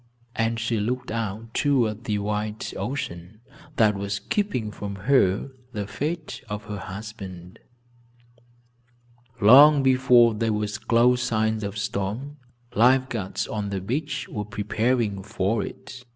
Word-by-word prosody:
And 115 0 0
she 115 0 -1
looked 125 +4 -2
out 115 0 -4
toward 120 -6 +1
the 105 -2 0
wild 105 +1 -3
ocean, 100 -7 -5 0.4
that 110 -2 +4
was 100 +1 -3
keeping 125 - -2
from 100 -1 -6
her 100 +1 +2 0.2
the 105 -2 -3
fate 150 - -4
of 105 0 -4
her 105 -1 -6
husband. 95 -3 -8 1.8
Long 140 +7 +8
before 130 -3 +5
there 110 0 0
were 105 0 0 0.2
close 120 +1 +4
signs 110 -2 0
of 100 +1 -4
storm, 105 +9 -3 0.4
life 130 +4 +4
guards, 100 -5 -3
on 105 -2 -3
the 100 -1 -2
beach, 135 - -3
were 105 - -4
preparing 105 0 -1
for 100 +2 -1
it. 125 0 -9
110 Hz, 130 wpm, -25 LUFS, 105-125 Hz, 1.8 s, Long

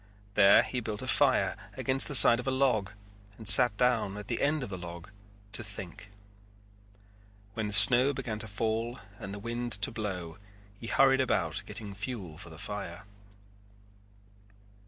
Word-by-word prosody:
There 100 0 +4
he 125 - -5
built 110 -3 -6
a - - -8
fire - - 0 0.2
against 135 +1 -3
the 145 - +2
side 120 -1 +11
of 125 - -9
a - - 0
log 130 -7 -1 0.5
and 110 - -12
sat 110 +1 +7
down 115 -5 -2
at 105 -1 -11
the 120 - -4
end 145 0 -2
of 105 - -9
the 95 - -7
log 85 +2 -11 0.4
to 115 - -6
think. 100 -1 -11 1.4
When 110 -1 -5
the 105 - -7
snow 120 +6 +6
began 110 -5 -7
to 110 - -5
fall 115 +3 -5 0.2
and 95 - -9
the 100 - -8
wind 120 +2 -6
to 100 +4 -1
blow 95 -6 -8 0.4
he 115 - -10
hurried 135 +2 +1
about 95 -9 -3
getting 105 -1 -9
fuel 100 -6 -8
for 90 - -10
the 80 - -14
fire. 95 -2 -9
110 Hz, 165 wpm, -27 LUFS, 100-120 Hz, 1.4 s, side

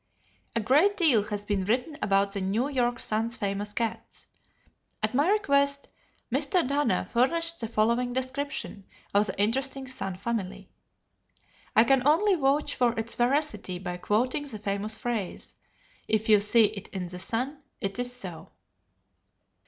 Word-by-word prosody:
A - - +4
great 295 - +3
deal 260 - +5
has 205 -1 -4
been 200 -2 0
written 250 - 0
about 195 0 +2
the 200 -1 -3
New 210 +8 0
York 245 -4 0
Sun's 225 +3 0
famous 205 -1 -2
cats. 225 +1 -4 0.8
At - - 0
my 290 +7 +2
request, 280 -9 +2 0.4
Mr. 360 -9 +2
Dana 285 +1 0
furnished 330 +7 +1
the 225 - -2
following 235 +3 +1
description 260 -5 -3 0.3
of 205 +1 +3
the 190 - -5
interesting 265 +5 0
Sun 225 -8 -4
family. 200 -2 -4 1.0
I 220 - +7
can 270 +2 +3
only 385 +7 +4
vouch 290 -3 +1
for 240 -2 +1
its 225 +1 -2
veracity 260 -6 0
by 180 -1 -5
quoting 250 +10 0
the 265 -7 -7
famous 205 +1 -2
phrase, 235 -7 -4 0.5
"If 220 0 0
you 210 -1 +7
see 215 +2 +5
it 205 -1 -5
in 180 -3 -5
the 180 0 -8
Sun, 255 +9 -3 0.2
it 195 +4 -3
is 245 0 0
so." 190 -9 -8
235 Hz, 150 wpm, -27 LUFS, 205-275 Hz, 1.0 s, I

